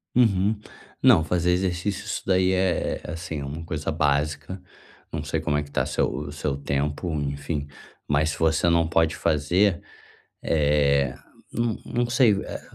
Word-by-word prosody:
Uhum. 105 -3 +3 0.4
Não, 120 -11 +6
fazer 90 +1 +1
exercício 95 +2 -1
isso - - -3
daí 95 -1 +3
é 95 -3 0
é, - - -6
assim, 85 -2 -5
é 70 - -5
uma 75 +4 -6
coisa 80 -2 -3
básica. 75 +5 -1 0.5
Não 75 -2 -3
sei 75 +2 -2
como 75 -2 0
é 75 - -1
que 70 - -14
tá - - +1
o - - -4
seu - - +1
o 70 +2 -5
seu 70 -1 -2
tempo, 70 +4 -2
enfim, 70 +1 -3 0.4
mas 75 +2 +2
se - - -7
você 80 +1 +3
não 85 -1 +3
pode 80 -1 +2
fazer, 85 +6 +2 0.6
eh, 70 -3 +2 0.4
não 115 -2 0
não 120 0 -1
sei, 125 -3 +5
eh, - - -6
80 Hz, 170 wpm, -25 LUFS, 75-95 Hz, 0.6 s, Não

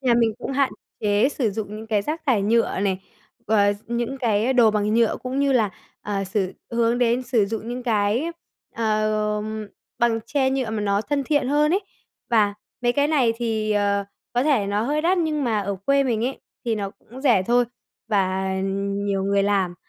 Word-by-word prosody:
nhà 250 -3 +3
mình 230 -2 +3
cũng - - -4
hạn 275 0 +2 0.3
chế 210 +4 +3
sử 250 -7 -1
dụng 210 +1 -5
những 220 - -8
cái 215 -2 +1
rác 310 +8 -3
thải 225 -7 +3
nhựa 225 -2 +2
này, 195 -2 0 0.5
ờ, 205 -1 +4
những 235 +3 -2
cái 230 0 +1
đồ 240 -4 +5
bằng 210 0 0
nhựa 230 -1 +3
cũng 255 +1 -3
như 280 -1 +3
là, 220 -6 +3 0.3
ờ, 200 -1 -2
sử 190 -1 -1 0.2
hướng 235 +1 +1
đến 245 +1 +2
sử 235 -4 +2
dụng 220 +2 -4
những 245 +1 -4
cái, 225 +4 +1 0.5
ờ, 215 -1 0 0.6
bằng 230 -1 +2
tre, 270 -1 +1
nhựa 265 -4 -1
mà 220 - -2
nó 200 0 +1
thân 280 +5 -1
thiện 290 -2 +1
hơn 300 +2 +3
ấy. 390 - +2 0.5
Và 210 -3 +3 0.3
mấy 240 0 +3
cái 285 +2 +2
này 265 -7 +3
thì, 220 -2 -1
ờ, 200 -1 +1 0.3
có 245 +1 +2
thể 275 -9 +2
nó 205 +1 0
hơi 295 +6 0
đắt 360 +3 +3
nhưng 310 -4 0
mà 220 -4 +1
ở 200 -1 -3
quê 275 0 +4
mình 230 -3 0
ấy 260 +2 -3 0.2
thì 230 -2 +1
nó 200 -2 -3
cũng 245 +4 -14
rẻ 240 -9 +4
thôi, 240 +5 +3 0.4
và 190 -2 +1 0.5
nhiều 195 -1 0
người 200 0 +2
làm, 195 -3 +1
225 Hz, 200 wpm, -23 LUFS, 205-255 Hz, 0.6 s, đồ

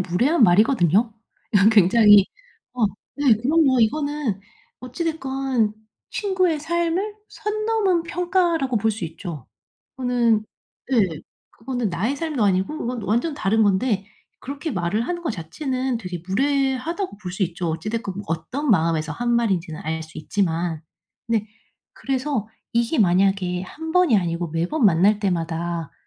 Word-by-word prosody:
무례한 235 - +2
말이거든요. 210 - +4 0.4
이건 205 0 +6
굉장히 205 0 +6 0.5
어 245 -2 0 0.3
네 285 -4 +4
그럼요. 270 +3 +3
이거는 285 -3 0 0.4
어찌 255 +7 -5
됐건 270 -8 -1 0.4
친구의 370 -5 0
삶을 340 +6 -1
선 425 0 -4
넘은 410 -6 +2
평가라고 340 -6 0
볼 220 +1 +2
수 215 -4 -4
있죠. 160 - -7 0.5
그거는 240 -4 +1 0.5
예. 250 - +4 0.5
그거는 245 -2 -3
나의 210 +11 -1
삶도 305 -6 -2
아니고 195 +9 +1
그건 245 -5 -4
완전 235 +11 0
다른 220 -3 +1
건데 200 +1 +1 0.4
그렇게 285 +3 -5
말을 185 +3 -1
하는 345 -1 -3
거 325 - -1
자체는 255 - -3
되게 180 -6 -6
무례하다고 275 - -1
볼 185 -4 -6
수 190 +1 0
있죠. 170 0 -4
어찌 165 +5 -4
됐건 220 -3 -3
뭐 200 - -6
어떤 195 - -3
마음에서 160 -5 +2
한 240 +8 -2
말인지는 190 -9 0
알 160 +1 -2
수 160 0 -11
있지만. 165 -2 -1 0.5
네 220 -2 0 0.5
그래서 265 -5 -2 0.2
이게 235 +5 +1
만약에 185 -2 +2
1 320 +11 -7
번이 360 -10 +4
아니고 170 -1 -2
매번 170 - -1
만날 200 +3 +4
때마다 170 -3 -2
225 Hz, 290 characters per minute, -22 LUFS, 180-285 Hz, 0.5 s, 이건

